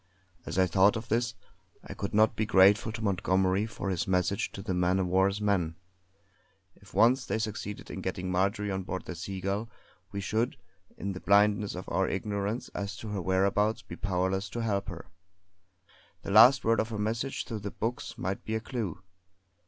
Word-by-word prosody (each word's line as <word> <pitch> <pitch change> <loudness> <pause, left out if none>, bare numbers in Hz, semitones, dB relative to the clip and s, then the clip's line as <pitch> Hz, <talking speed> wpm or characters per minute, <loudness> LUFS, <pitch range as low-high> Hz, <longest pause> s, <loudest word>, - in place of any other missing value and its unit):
As - - -4
I 95 - +5
thought 95 +4 +4
of 115 0 -5
this, 115 0 0 0.5
I - - -8
could 100 - -4
not 110 +1 +5
but - - -23
be 110 - -1
grateful 100 +3 +5
to 110 0 -6
Montgomery 95 +1 +1
for 100 -3 -4
his 90 - -1
message 95 +1 0
to 95 - -7
the 95 -3 -2
man 90 +1 +2
of 95 - +1
war's 95 +3 +2
men. 95 -6 0 1.0
If 100 - -18
once 125 +3 +5
they 110 -3 -2
succeeded 110 -2 -5
in - - -5
getting 90 0 -3
Marjory 100 +3 0
on 95 0 -2
board 95 0 -5
the - - -5
Seagull 95 +5 -3 0.4
we 100 - -4
should, 110 +5 -1 0.4
in 100 - -3
the 95 - -6
blindness 100 +1 +3
of 90 - -7
our 95 +2 0
ignorance 100 +3 -2
as 100 -1 -5
to 110 - -7
her 100 -2 -2
whereabouts, 100 +4 +1
be - - -9
powerless 95 0 -1
to 120 - -4
help 100 -3 -1
her. 85 0 -8 1.2
The - - -4
last 115 +5 +7
word 115 +1 +3
of 110 - 0
her 110 - -4
message 115 +6 -2
through 110 -3 -5
the 100 0 -5
books 115 +4 -4
might 95 +2 -3
be 110 - -3
a - - 0
clue. 110 - -5
100 Hz, 190 wpm, -29 LUFS, 95-110 Hz, 1.2 s, last